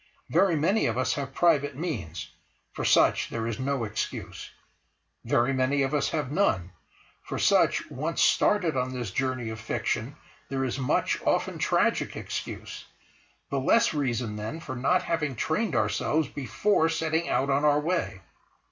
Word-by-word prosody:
Very 190 -4 +4
many 165 +9 +2
of - - -1
us 130 - +1
have 140 -2 -4
private 145 -3 +2
means; 90 - -5 0.4
for - - -4
such - - +3
there 115 -1 -3
is 115 -2 -3
no 135 -1 -1
excuse. 110 0 -5 0.8
Very 120 +3 +2
many 135 +2 +1
of 135 +2 -2
us 145 -2 +1
have 150 -5 -2
none; 110 - +1 0.5
for - - -5
such, - - +3
once 155 +6 -3
started 180 -7 +3
on 130 0 -1
this 120 -6 -4
journey 130 0 -2
of 110 - -7
fiction, 115 +3 -2 0.3
there 135 -1 -1
is 130 +1 -3
much, 130 - 0
often - - 0
tragic, - - +1
excuse—the 140 - -7
less 230 - +3
reason 120 -7 -1
then 110 +10 -5
for 135 -5 -6
not 180 +9 +2
having 150 -6 -1
trained 160 - -1
ourselves 110 +9 +1
before 160 - +1
setting 160 +1 -1
out 140 +1 +1
on 140 +2 +2
our 150 -1 +4
way. 160 - -2
135 Hz, 155 wpm, -27 LUFS, 120-160 Hz, 0.8 s, Very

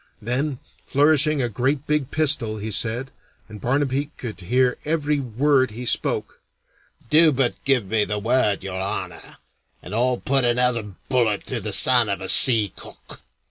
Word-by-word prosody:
Then, 130 +5 -3 0.3
flourishing 150 0 +2
a - - 0
great 130 +6 -2
big 150 -4 -1
pistol, 145 -8 0
he 110 +1 -5
said, 120 +5 -1 0.4
and 105 -2 -12
Barnaby 140 +2 -1
could 115 -5 -7
hear 125 +7 0
every 150 -1 -1
word 130 +1 +1
he 120 +4 -8
spoke, - - -2 0.7
"Do 155 +1 +6
but 130 -3 0
give 135 -5 +2
me 110 +2 0
the 105 - -3
word, 110 -2 0
Your 95 -1 -5
Honor, 95 - -6 0.4
and - - -11
I'll 125 +2 +1
put 135 +1 0
another 120 -4 0
bullet 115 -6 0
through 130 - -3
the 105 0 -3
son 120 +2 +4
of 100 - -2
a 95 - -6
sea 110 -8 +6
cook." - - -13
125 Hz, 160 wpm, -22 LUFS, 110-140 Hz, 0.7 s, Do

